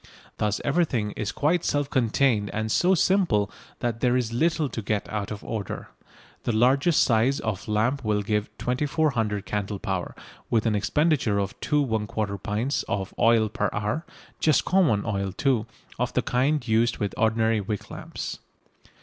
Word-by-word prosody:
Thus 105 Hz, -1 st, 0 dB
everything 135 Hz, -9 st, +1 dB
is 105 Hz, +1 st, -3 dB
quite 160 Hz, +4 st, +1 dB
self 145 Hz, -1 st, 0 dB
contained 115 Hz, -4 st, +2 dB
and 110 Hz, 0 st, -1 dB
so 185 Hz, +9 st, +4 dB
simple 165 Hz, -, +2 dB, 0.3 s
that 120 Hz, -2 st, -1 dB
there 125 Hz, +1 st, +2 dB
is 115 Hz, -2 st, -1 dB
little 160 Hz, +3 st, +1 dB
to 115 Hz, -3 st, -5 dB
get 105 Hz, 0 st, -2 dB
out 105 Hz, -2 st, -3 dB
of 105 Hz, -1 st, -6 dB
order. 105 Hz, -4 st, -5 dB, 0.5 s
The -, -, -1 dB
largest 135 Hz, +8 st, +4 dB
size 120 Hz, +3 st, +2 dB
of 110 Hz, -3 st, -3 dB
lamp 115 Hz, +6 st, +1 dB
will 105 Hz, -1 st, +1 dB
give 105 Hz, 0 st, -1 dB
2400 125 Hz, -6 st, 0 dB
candle 100 Hz, 0 st, -2 dB
power, 95 Hz, -3 st, -3 dB, 0.3 s
with 115 Hz, -2 st, +2 dB
an 110 Hz, -, +2 dB
expenditure 120 Hz, +1 st, +1 dB
of 100 Hz, 0 st, -1 dB
2 150 Hz, -2 st, +1 dB
1/4 105 Hz, -3 st, -2 dB
pints 115 Hz, +9 st, -1 dB
of 95 Hz, -1 st, -2 dB
oil 115 Hz, -1 st, +4 dB
per 105 Hz, -1 st, -1 dB
hour, 105 Hz, +9 st, -2 dB, 0.4 s
just 155 Hz, -4 st, +3 dB
common 160 Hz, -, +3 dB
oil, 100 Hz, -3 st, -1 dB
too, 120 Hz, +2 st, 0 dB, 0.3 s
of -, -, -1 dB
the -, -, +1 dB
kind 135 Hz, +2 st, +1 dB
used 115 Hz, +1 st, +2 dB
with 100 Hz, -1 st, -2 dB
ordinary 110 Hz, 0 st, +2 dB
wick 105 Hz, 0 st, -5 dB
lamps. -, -, -6 dB
110 Hz, 160 wpm, -25 LUFS, 105-135 Hz, 0.5 s, so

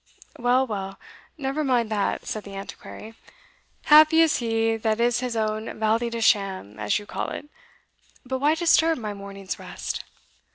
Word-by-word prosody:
"Well, 250 Hz, +2 st, +3 dB
well 195 Hz, -4 st, -5 dB, 0.4 s
never 280 Hz, +1 st, -2 dB
mind 245 Hz, -5 st, +1 dB
that," 205 Hz, -2 st, -1 dB
said 215 Hz, -, -4 dB
the 200 Hz, -1 st, -10 dB
Antiquary 205 Hz, +2 st, -9 dB, 0.7 s
"happy 310 Hz, +2 st, +7 dB
is 325 Hz, -2 st, +4 dB
he 225 Hz, -1 st, 0 dB
that 220 Hz, 0 st, 0 dB
is 240 Hz, 0 st, +2 dB
his 250 Hz, -2 st, -3 dB
own 215 Hz, 0 st, -2 dB
valley 225 Hz, +2 st, +1 dB
de 230 Hz, 0 st, -4 dB
sham, 190 Hz, -, +1 dB
as 105 Hz, 0 st, +1 dB
you 205 Hz, -, -7 dB
call -, -, -4 dB
it 295 Hz, -, -7 dB, 0.8 s
But 260 Hz, +1 st, -3 dB
why 295 Hz, +3 st, +3 dB
disturb 325 Hz, -1 st, +3 dB
my 215 Hz, -4 st, -4 dB
morning's 195 Hz, -1 st, -7 dB
rest?" -, -, -5 dB
225 Hz, 160 wpm, -25 LUFS, 205-260 Hz, 0.8 s, happy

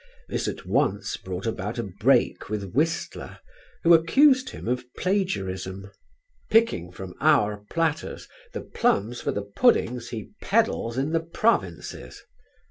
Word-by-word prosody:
This -, -, -2 dB
at -, -, -5 dB
once -, -, 0 dB
brought 95 Hz, +1 st, -6 dB
about 110 Hz, 0 st, -3 dB
a 120 Hz, -, -1 dB
break 95 Hz, -1 st, +1 dB
with 100 Hz, -3 st, -4 dB
Whistler 165 Hz, +5 st, -1 dB, 0.5 s
who 170 Hz, -, +7 dB
accused 260 Hz, -, +5 dB
him -, -, -8 dB
of 125 Hz, +1 st, 0 dB
plagiarism: 100 Hz, -, -2 dB, 0.6 s
"Picking 220 Hz, -, +3 dB
from 90 Hz, 0 st, -8 dB
our 105 Hz, 0 st, +3 dB
platters 165 Hz, -2 st, -2 dB, 0.2 s
the -, -, -5 dB
plums 120 Hz, -, 0 dB
for -, -, -1 dB
the 100 Hz, -, -3 dB
puddings 120 Hz, -, +2 dB
he 115 Hz, -2 st, -7 dB
peddles 200 Hz, -, +1 dB
in 140 Hz, +4 st, 0 dB
the 165 Hz, -, +2 dB
provinces." 105 Hz, -, -1 dB
120 Hz, 130 wpm, -25 LUFS, -, 0.6 s, who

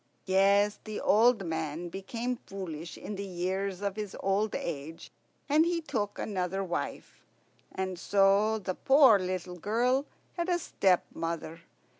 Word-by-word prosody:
Yes, 200 Hz, +2 st, +3 dB
the 215 Hz, -1 st, -5 dB
old 225 Hz, -1 st, +4 dB
man 160 Hz, +1 st, -3 dB
became 230 Hz, +7 st, -4 dB
foolish 170 Hz, -4 st, -6 dB
in 205 Hz, -, -6 dB
the 200 Hz, -, -4 dB
years 190 Hz, +1 st, -3 dB
of 200 Hz, -1 st, -1 dB
his 210 Hz, -2 st, -5 dB
old 195 Hz, +2 st, +1 dB
age, 160 Hz, 0 st, -5 dB, 0.4 s
and 300 Hz, +2 st, +5 dB
he 340 Hz, 0 st, 0 dB
took 210 Hz, -10 st, -3 dB
another 190 Hz, -1 st, -2 dB
wife. 175 Hz, -2 st, -5 dB, 0.5 s
And 190 Hz, -2 st, -4 dB
so 200 Hz, +3 st, +3 dB
the 190 Hz, -3 st, -3 dB
poor 265 Hz, -2 st, +6 dB
little 180 Hz, -1 st, -4 dB
girl 245 Hz, -, +1 dB, 0.3 s
had 345 Hz, +1 st, -1 dB
a 350 Hz, -, +3 dB
stepmother. 170 Hz, -, -1 dB
195 Hz, 135 wpm, -30 LUFS, 180-220 Hz, 0.5 s, poor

